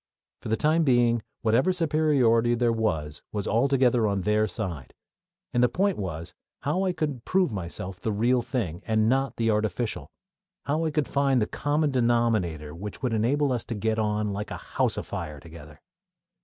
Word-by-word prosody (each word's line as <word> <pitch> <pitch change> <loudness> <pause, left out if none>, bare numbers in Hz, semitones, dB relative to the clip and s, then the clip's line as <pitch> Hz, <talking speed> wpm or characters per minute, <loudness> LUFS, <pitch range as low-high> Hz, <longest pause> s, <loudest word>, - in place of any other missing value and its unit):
For - - -6
the 110 - +1
time 160 +2 +3
being 120 -4 +3 0.2
whatever 120 +11 +3
superiority 145 -9 +2
there 120 -1 +2
was 80 -10 -2
was 105 -2 -3
altogether 125 -1 +3
on 100 -1 0
their 105 +2 +2
side, 85 - -5 0.6
and 120 - +3
the 125 - +5
point 195 - +1
was 85 -4 -5 0.3
how 175 +7 0
I 185 - +2
could 150 -8 -3
prove 185 - +1
myself 90 0 -5
the 110 - -1
real 120 +4 +2
thing, 115 - -3
and 110 -1 +2
not 135 +3 +1
the 115 -1 +1
artificial; 110 +2 -2 0.6
how 155 +3 0
I - - +1
could 150 -1 0
find 140 -2 +2
the 105 - +2
common 145 +5 0
denominator 115 - +1
which 100 +9 -8
would 125 -3 0
enable 135 +6 +1
us 125 -2 -1
to 115 - -4
get 110 +1 0
on 105 -1 0
"like 105 +1 -4
a - - -5
house - - -1
afire" 75 -3 -5
together. 75 -1 -13
115 Hz, 175 wpm, -26 LUFS, 105-135 Hz, 0.6 s, the